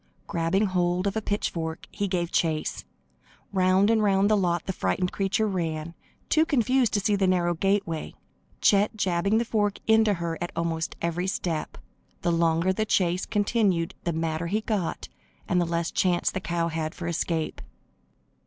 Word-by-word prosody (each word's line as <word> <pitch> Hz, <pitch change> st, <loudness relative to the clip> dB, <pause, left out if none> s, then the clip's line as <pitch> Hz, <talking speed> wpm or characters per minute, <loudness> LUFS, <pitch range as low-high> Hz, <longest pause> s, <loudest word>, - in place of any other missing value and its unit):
Grabbing 170 Hz, +5 st, +1 dB
hold 180 Hz, -1 st, 0 dB
of 200 Hz, 0 st, -1 dB
a 220 Hz, -, 0 dB
pitchfork, 165 Hz, -6 st, -3 dB
he 205 Hz, -1 st, -2 dB
gave 175 Hz, -3 st, -1 dB
chase. 160 Hz, -2 st, -1 dB, 0.7 s
Round 190 Hz, +2 st, +4 dB
and 225 Hz, -1 st, +3 dB
round 200 Hz, 0 st, +3 dB
the -, -, +5 dB
lot 175 Hz, -4 st, 0 dB
the 190 Hz, -, -2 dB
frightened 180 Hz, 0 st, -1 dB
creature 195 Hz, +2 st, 0 dB
ran, 165 Hz, -4 st, -3 dB, 0.3 s
too 315 Hz, -, +4 dB
confused 255 Hz, -5 st, +2 dB
to -, -, +3 dB
see 205 Hz, +1 st, +1 dB
the 195 Hz, -1 st, +2 dB
narrow 175 Hz, -1 st, +2 dB
gateway, 185 Hz, -2 st, -1 dB, 0.5 s
Chet 205 Hz, +1 st, +3 dB
jabbing 190 Hz, +2 st, +1 dB
the 235 Hz, -, +1 dB
fork 205 Hz, -3 st, 0 dB
into 220 Hz, -2 st, +4 dB
her 170 Hz, -1 st, -4 dB
at 175 Hz, -, -3 dB
almost 165 Hz, -1 st, -2 dB
every 170 Hz, +2 st, -1 dB
step. 170 Hz, -4 st, -3 dB, 0.5 s
The 175 Hz, -, +2 dB
longer 165 Hz, +2 st, +2 dB
the 215 Hz, -, 0 dB
chase 180 Hz, -4 st, +1 dB
continued 205 Hz, -5 st, +1 dB
the 170 Hz, -, 0 dB
madder 160 Hz, 0 st, -2 dB
he 210 Hz, +5 st, 0 dB
got 210 Hz, -6 st, -2 dB, 0.4 s
and 180 Hz, 0 st, +2 dB
the -, -, +1 dB
less 170 Hz, 0 st, -1 dB
chance 180 Hz, -2 st, +1 dB
the -, -, -3 dB
cow 170 Hz, -2 st, -1 dB
had 160 Hz, -1 st, -3 dB
for 175 Hz, -, -6 dB
escape. 165 Hz, -1 st, -2 dB
180 Hz, 170 wpm, -26 LUFS, 170-205 Hz, 0.7 s, the